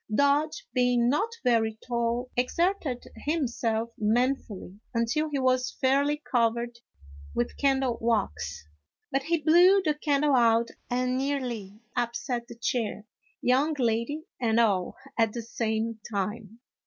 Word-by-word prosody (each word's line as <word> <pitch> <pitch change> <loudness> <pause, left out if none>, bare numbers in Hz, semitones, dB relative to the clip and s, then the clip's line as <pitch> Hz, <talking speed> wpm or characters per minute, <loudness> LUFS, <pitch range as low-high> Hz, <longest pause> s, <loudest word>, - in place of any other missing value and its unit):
Dodge, 285 - +2
being 245 -1 +3
not 400 - +1
very 225 -3 +2
tall, 240 +1 -1
exerted 290 +1 0
himself 235 -7 -1
manfully 220 -3 -1 0.2
until 240 +7 +1
he 290 - -2
was 255 -1 +1
fairly 280 +3 +2
covered 235 -1 +1 0.6
with 120 - -1
candle 265 -3 +1
wax, 75 - -1 0.4
but 270 - +1
he 335 +5 +1
blew 350 +6 +6
the 305 -3 +2
can 290 -1 0
dle 295 -2 +3
out 230 -1 +4 0.2
and 250 +1 0
nearly 240 -7 -3
upset 240 0 -2
the 235 - -10
chair, 230 -2 -2 0.4
young 275 +5 +3
lady 235 +5 0 0.2
and 230 -2 +2
all, 195 -6 +2 0.2
at 225 -2 +3
the 235 - -4
same 225 0 -2
time. 210 +2 -4
245 Hz, 130 wpm, -27 LUFS, 225-275 Hz, 0.6 s, blew